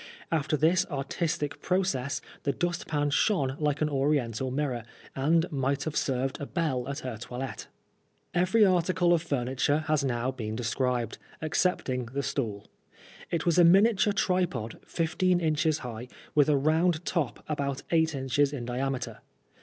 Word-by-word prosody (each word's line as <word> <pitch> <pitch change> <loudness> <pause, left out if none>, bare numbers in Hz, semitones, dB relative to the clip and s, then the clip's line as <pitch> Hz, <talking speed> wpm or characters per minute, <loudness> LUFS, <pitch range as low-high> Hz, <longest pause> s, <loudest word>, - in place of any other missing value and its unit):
After 155 -1 +1
this 170 +5 +4
artistic 145 +1 -2
process 180 -8 0 0.2
the 140 - 0
dust 175 +5 -2
pan 145 -2 0
shone 140 -5 +2
like 150 -1 0
an 155 - +1
oriental 135 -4 0
mirror, 130 -3 -2 0.3
and 160 +5 +3
might 135 -1 0
have 155 -1 -4
served 130 0 -1
a 140 - -4
belle 135 -6 -1
at 140 +2 -4
her 125 -3 -5
toilette. 125 +1 -6 0.7
Every 185 +5 +4
article 180 -1 +3
of 170 - +2
furniture 140 0 0
has 155 -2 +1
now 125 -1 0
been 110 -4 -5
described, 120 0 -1 0.2
excepting 155 -6 0
the 140 +4 -3
stool. 110 -9 -3 0.6
It 170 -2 -1
was 170 0 +3
a - - +8
miniature 205 +4 +5
tripod, 180 - -1
fifteen 175 +2 +1
inches 155 -1 +1
high, 120 0 -6 0.3
with 145 -1 +4
a 145 - +4
round 160 +4 +2
top 165 -8 -2
about 140 -2 -2
eight 160 -2 +3
inches 135 +1 +1
in 130 -5 -5
diameter. 130 +2 -3
145 Hz, 150 wpm, -28 LUFS, 130-165 Hz, 0.7 s, a